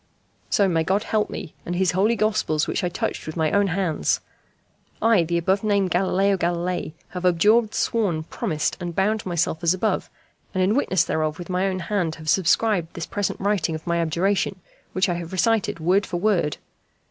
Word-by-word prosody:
So 200 - +3
may 165 -3 +1
God 195 +5 +1
help 215 -2 0
me, - - -7
and 175 - -4
his 185 0 +2
Holy 205 +6 +2
Gospels 210 -8 +1
which - - -2
I 180 - +1
touch 175 - -3
with 155 - -5
my 160 -2 +1
own 200 0 +3
hands. 175 -4 0 0.8
I, 225 -6 +4
the 170 +1 -1
above 190 +4 +1
named 200 -3 +1
Galileo 195 +2 +2
Galilei, 175 -1 -2 0.2
have 180 -1 -6
abjured, 210 +6 +3
sworn, 195 -9 0
promised, 155 -1 -2
and 175 -2 -5
bound 210 +3 0
myself 170 -1 -1
as 170 +2 +3
above, 215 +4 -1 0.5
and 185 - +2
in 195 +3 +3
witness 190 - +2
thereof 155 -1 -1
with 175 +1 -7
my 185 +2 +1
own 185 -1 -2
hand 175 -5 -1
have 155 -1 -6
subscribed 190 -1 +2
this 170 - -4
present 205 -1 -2
writing 195 -5 0
of 155 - -8
my 170 -1 0
abjuration, 185 +4 0 0.3
which 185 +2 +2
I 175 - 0
have 170 -1 -5
recited 205 -1 +1
word 185 +5 +2
for 175 - -3
word. 175 -6 +1
185 Hz, 190 wpm, -23 LUFS, 170-200 Hz, 0.8 s, I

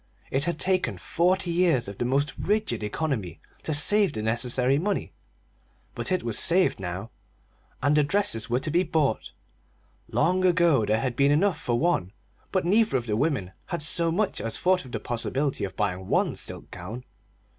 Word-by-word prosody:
It 135 +2 +2
had 170 -2 -1
taken 185 +2 0
forty 180 +1 0
years 170 - +2
of 100 -1 -8
the 120 - 0
most 135 +2 0
rigid 210 - -1
economy 105 - -3 0.2
to - - -4
save 190 +4 +4
the 110 - -3
necessary 125 +4 +2
money; 200 +4 -2 0.8
but - - -2
it 185 - +1
was 115 -3 -1
saved 180 - +3
now, 95 +4 -5 0.7
and 145 +2 +3
the 150 - +4
dresses 145 - 0
were 120 - +2
to 155 - -2
be 175 +3 +3
bought. 155 -8 0 0.8
Long 185 +2 +1
ago 170 - +3
there 110 +2 +1
had 125 -2 -2
been 140 +2 +3
enough 165 +2 +2
for 120 -1 0
one, 120 - 0 0.4
but 185 -3 0
neither 210 -3 +3
of 120 - -4
the 105 -3 -1
women 125 - -1 0.2
had 170 -4 -3
so 165 +2 +1
much 195 - -1
as 115 +1 -3
thought 185 -3 +1
of 130 - -11
the - - -3
possibility 130 +3 -2
of 95 - -9
buying 95 +1 -2
one - - +1
silk - - -6
gown. 105 +8 -7
145 Hz, 180 wpm, -26 LUFS, 115-175 Hz, 0.8 s, save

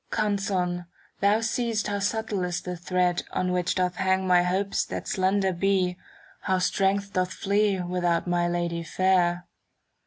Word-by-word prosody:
Canzon', 190 -4 -1 0.3
thou 205 +3 +3
see'st 225 -1 -1
how 205 -1 -1
subtle 205 -1 -1
is 175 -1 -2
the 180 -1 -5
thread, 180 0 0
*" - - -27
On 180 0 0
which 180 -1 0
doth 180 -1 0
hang 190 0 +1
my 180 -1 +5
hopes 190 +3 0
that - - -6
slender 190 -1 +1
^"' 185 0 +1 0.5
How 190 -1 +1
strength 195 +2 0
doth 185 0 0
flee 200 -1 +1
without 175 -1 0
my 175 -1 +1
Lady 175 -1 -1
fair. 175 +1 +1
185 Hz, 155 wpm, -26 LUFS, 180-200 Hz, 0.5 s, my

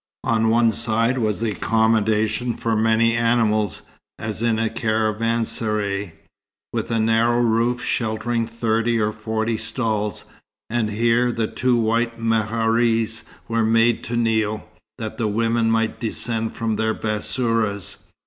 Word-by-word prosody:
On 115 -1 +2
one 115 0 +4
side 115 +3 +1
was 110 -1 -1
accommodation 110 +1 +1
for 115 -1 -1
many 115 +1 +3
animals, 115 -5 +1 0.3
as 110 0 -4
in 115 -2 +2
a 115 0 +1
caravanserai, 110 -3 -1 0.6
with - - -2
a 115 -1 0
narrow 115 +2 +2
roof 120 +1 +1
sheltering 115 +1 -1
thirty 115 0 0
or 105 0 +1
forty 110 +1 -2
stalls; 110 -4 -2 0.5
and 115 -2 0
here 115 +3 +2
the 115 -1 -1
two 125 +3 0
white 115 +1 0
meharis 115 0 +1 0.2
were 115 0 +1
made 115 +1 +3
to 120 - -3
kneel, 110 -2 0 0.3
that 110 -2 -6
the 115 - +1
women 115 +2 +1
might 115 0 0
descend 115 -1 -2
from 110 -2 -1
their 110 0 0
bassourahs. 110 -2 -1
115 Hz, 130 wpm, -22 LUFS, 110-115 Hz, 0.6 s, one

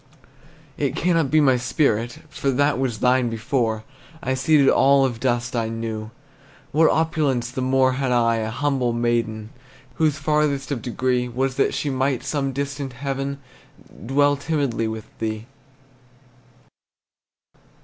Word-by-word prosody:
It - - 0
cannot 165 -5 +1
be 155 - +4
my 135 -4 +4
spirit, 120 -2 0
For 145 -2 -2
that 145 +1 +2
was 120 -5 -2
thine 125 -1 +3
before; 115 -1 -1 0.4
I 130 - 0
ceded 140 +1 +3
all 135 0 +5
of 120 -3 -3
dust 120 -1 -1
I 115 -1 0
knew, 110 -1 -4 0.6
What 160 +2 +4
opulence 150 -7 0
the 130 0 -4
more 130 0 +3
Had 130 0 -1
I, 115 -1 +3
a 110 -1 -2
humble 130 0 0
maiden, 115 -2 -1 0.5
Whose 155 -2 +2
farthest 145 -1 0
of 130 -5 -2
degree 125 +1 -1
Was 130 +2 -1
that - - +2
she 145 - -1
might, 130 -1 0
Some 135 0 -1
distant 140 0 -4
heaven, 135 +1 -3 0.7
Dwell 145 +2 +3
timidly 140 -7 -1
with 110 -1 -5
thee! 110 0 -3
130 Hz, 140 wpm, -22 LUFS, 120-140 Hz, 0.7 s, all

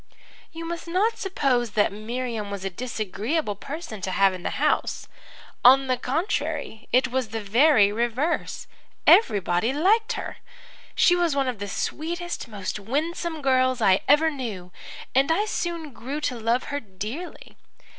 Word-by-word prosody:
"You 330 0 -7
must 340 0 -5
not 410 +7 +1
suppose 255 - 0
that 205 -2 +2
Miriam 225 0 -4
was 200 -1 -5
a 195 - -2
disagreeable 225 - -2
person 275 - -7
to 190 - -3
have 195 +1 +3
in 185 - -7
the - - -2
house. - - 0 0.6
On 270 +2 +7
the 255 -1 +1
contrary, 290 - -2
it 255 +1 +3
was 255 -1 -1
the 225 +1 -3
very 220 0 +4
reverse. 240 +8 -1 0.4
Everybody 205 - +4
liked 435 - +2
her. - - -6 0.6
She 355 - +5
was 345 -4 +1
one 275 -1 +1
of 245 -5 -3
the 205 - -4
sweetest, 345 - -4
most 205 -2 -5
winsome 315 - -3
girls 255 -1 +3
I 195 -3 +4
ever 310 +3 +5
knew, 215 -11 -6 0.4
and 270 +4 +3
I 405 +6 +2
soon 335 -8 -3
grew 270 +5 -5
to 270 -4 -1
love 230 +3 +1
her 285 - 0
dearly. 220 - -8
255 Hz, 155 wpm, -25 LUFS, 215-320 Hz, 0.6 s, On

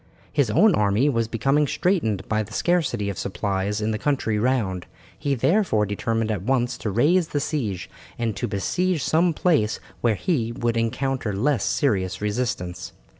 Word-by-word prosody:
His 140 -6 +2
own 205 - +5
army 105 +4 +2
was 115 -4 0
becoming 135 +6 +1
straitened 140 - 0
by 110 0 +1
the 110 +1 -8
scarcity 155 - 0
of 100 - -4
supplies 100 +1 -2
in 110 +1 0
the 110 - -2
country 130 -7 0
round, 105 -7 0 0.3
he 140 -1 -1
therefore 150 - +2
determined 110 +2 -1
at 105 -4 -2
once 125 +3 0
to 110 - -2
raise 160 - +3
the 145 - -1
siege, 115 - -2 0.3
and 115 -3 -1
to 120 - -2
besiege 160 - 0
some 170 +2 +3
place 150 -10 +1 0.2
where 115 -3 +2
he 120 - -1
would 120 -1 -1
encounter 115 0 -1
less 125 +6 +1
serious 95 -10 0
resistance. 105 -4 -3
115 Hz, 165 wpm, -24 LUFS, 105-145 Hz, 0.3 s, own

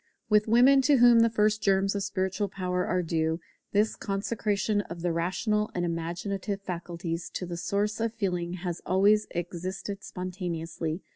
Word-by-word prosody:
With 210 0 +4
women, 250 +5 +6
to 280 +1 +4
whom 240 -1 +7
the 230 0 +5
first 215 -1 +2
germs 195 -1 +2
of 200 - -2
spiritual 190 +1 -1
power 180 -1 -2
are 180 0 +1
due, 160 0 0 0.3
this 210 +2 +2
consecration 205 0 -1
of 170 0 -7
the 175 - +1
rational 210 +5 0
and 175 -1 0
imaginative 175 +4 -3
faculties 170 -2 -4
to 180 - -2
the 175 -1 -5
source 205 +5 -1
of 230 0 0
feeling 180 -6 -2
has 175 -1 -4
always 205 +3 +3
existed 185 +3 -5
spontaneously. 175 -2 -4
190 Hz, 155 wpm, -28 LUFS, 175-210 Hz, 0.3 s, whom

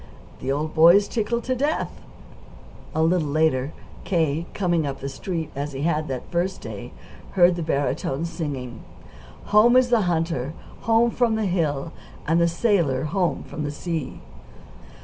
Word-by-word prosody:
The 130 - -2
old 150 +3 -2
boy's 170 +6 +6
tickled 235 +1 -1
to 255 - 0
death." 290 +5 0 1.0
A 160 - +2
little 165 -1 +2
later, 145 -2 +1 0.3
K., 165 -2 0
coming 175 -6 +1
up 140 - -4
the 140 - -5
Street 160 +3 -4
as 145 +1 -4
he 135 +1 -4
had 155 -1 0
that 130 -2 -5
first 180 +2 -1
day, - - -7 0.4
heard 175 -2 +5
the 175 - -4
barytone 145 -1 -1
singing: 140 -8 -5 0.7
"Home 235 +4 +7
is 255 -1 +4
the 235 -2 +4
hunter, 160 -4 -1 0.3
home 230 +1 +4
from 235 -2 +1
the 220 -1 0
hill, 165 -4 -1 0.3
And 165 +2 +3
the 170 - +4
sailor, 170 - +1
home 180 +3 0
from 150 -1 -5
sea." 160 +1 -4
165 Hz, 150 wpm, -24 LUFS, 145-190 Hz, 1.0 s, Home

